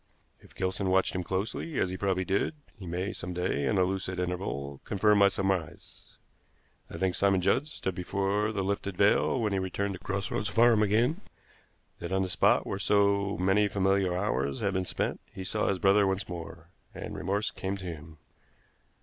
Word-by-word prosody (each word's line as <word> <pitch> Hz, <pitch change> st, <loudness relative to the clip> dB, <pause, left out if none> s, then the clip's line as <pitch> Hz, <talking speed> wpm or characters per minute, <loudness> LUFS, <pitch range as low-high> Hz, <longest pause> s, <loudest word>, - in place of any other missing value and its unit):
"If -, -, -20 dB
Gilson 95 Hz, +1 st, -1 dB
watched 95 Hz, 0 st, +2 dB
him 90 Hz, -, -1 dB
closely, 100 Hz, -, -3 dB
as 90 Hz, -, +1 dB
he -, -, -3 dB
probably 95 Hz, -1 st, 0 dB
did, 100 Hz, -, 0 dB, 0.2 s
he 100 Hz, -6 st, -10 dB
may 90 Hz, +4 st, -2 dB
some 90 Hz, +1 st, -6 dB
day, 90 Hz, -6 st, -1 dB
in 65 Hz, -, +1 dB
a 95 Hz, -, +4 dB
lucid 95 Hz, 0 st, -2 dB
interval, 85 Hz, -7 st, -3 dB
confirm 105 Hz, 0 st, +3 dB
my 100 Hz, -, +7 dB
surmise. 95 Hz, -4 st, -3 dB, 0.7 s
I -, -, -7 dB
think 95 Hz, -1 st, 0 dB
Simon 100 Hz, 0 st, +2 dB
Judd 130 Hz, +10 st, +2 dB
stood 95 Hz, -10 st, -4 dB
before 100 Hz, +4 st, -1 dB
the 100 Hz, -3 st, -2 dB
lifted 100 Hz, -1 st, -2 dB
veil 105 Hz, +5 st, +3 dB
when 105 Hz, -3 st, 0 dB
he 95 Hz, -, +1 dB
returned 100 Hz, +2 st, -2 dB
to 95 Hz, -, -8 dB
Cross 100 Hz, +1 st, -3 dB
Roads 105 Hz, +2 st, -1 dB
Farm 115 Hz, 0 st, +4 dB
again; 115 Hz, -, +2 dB, 0.8 s
that 85 Hz, -, -6 dB
on 95 Hz, 0 st, +2 dB
the 95 Hz, -, -3 dB
spot 90 Hz, -, +3 dB
where 95 Hz, -, -3 dB
so 100 Hz, 0 st, +2 dB
many 95 Hz, +3 st, +3 dB
familiar 95 Hz, -2 st, +1 dB
hours 70 Hz, -9 st, -1 dB
had 100 Hz, -1 st, 0 dB
been 95 Hz, -1 st, -1 dB
spent -, -, -2 dB
he 95 Hz, -, -7 dB
saw 105 Hz, +3 st, -1 dB
his 95 Hz, -, +1 dB
brother 100 Hz, +2 st, +4 dB
once 95 Hz, +1 st, -1 dB
more, 85 Hz, -1 st, -8 dB, 0.2 s
and -, -, -6 dB
remorse 100 Hz, +3 st, -1 dB
came 95 Hz, 0 st, -4 dB
to 95 Hz, -, -9 dB
him. 80 Hz, -2 st, -8 dB
95 Hz, 190 wpm, -29 LUFS, 90-100 Hz, 0.8 s, my